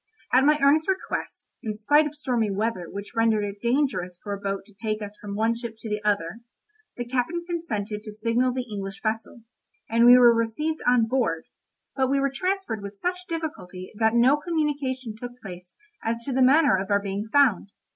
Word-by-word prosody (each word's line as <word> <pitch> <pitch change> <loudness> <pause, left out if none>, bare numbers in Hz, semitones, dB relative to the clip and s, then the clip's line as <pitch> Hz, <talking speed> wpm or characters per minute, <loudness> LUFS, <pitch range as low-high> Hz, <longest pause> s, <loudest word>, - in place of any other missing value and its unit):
At 260 +2 +5
my 300 +1 +5
earnest 300 +3 +4
request, 380 0 -4
in 215 -2 -4
spite 290 +8 +3
of 300 - -9
stormy 245 -7 0
weather 200 -3 -2
which 200 +2 -8
rendered 225 -2 +2
it 200 0 -5
dangerous 235 -8 0
for 205 - -4
a 200 - -5
boat 195 0 -3
to 210 - -20
take 215 +1 -3
us 205 -1 -7
from 200 -1 -6
one 225 +2 +2
ship 230 -1 -6
to 220 - -8
the 210 0 -2
other, 205 -1 0 0.6
the 245 - -3
captain 260 +8 -2
consented 220 - -3
to 215 - -6
signal 230 +4 +1
the 250 0 -3
English 200 -1 -6
vessel, 220 +1 -3 0.5
and 230 +1 +4
we 245 +1 +10
were 240 -1 +7
received 230 +8 -1
on 245 -2 +5
board, 225 -10 0 0.5
but 265 -2 +1
we 275 0 +2
were 275 0 +1
transferred 370 - -2
with 200 0 -8
such 360 0 -3
difficulty 300 - -5
that 220 +1 +1
no 255 +5 +5
communication 290 -7 -2
took 245 +2 -9
place 180 -4 -10 0.3
as 230 +1 -2
to 270 - -3
the 260 - +1
manner 290 +2 +5
of 190 - -5
our 200 0 +3
being 200 +1 -4
found. 260 -10 +3
230 Hz, 195 wpm, -25 LUFS, 210-275 Hz, 0.6 s, we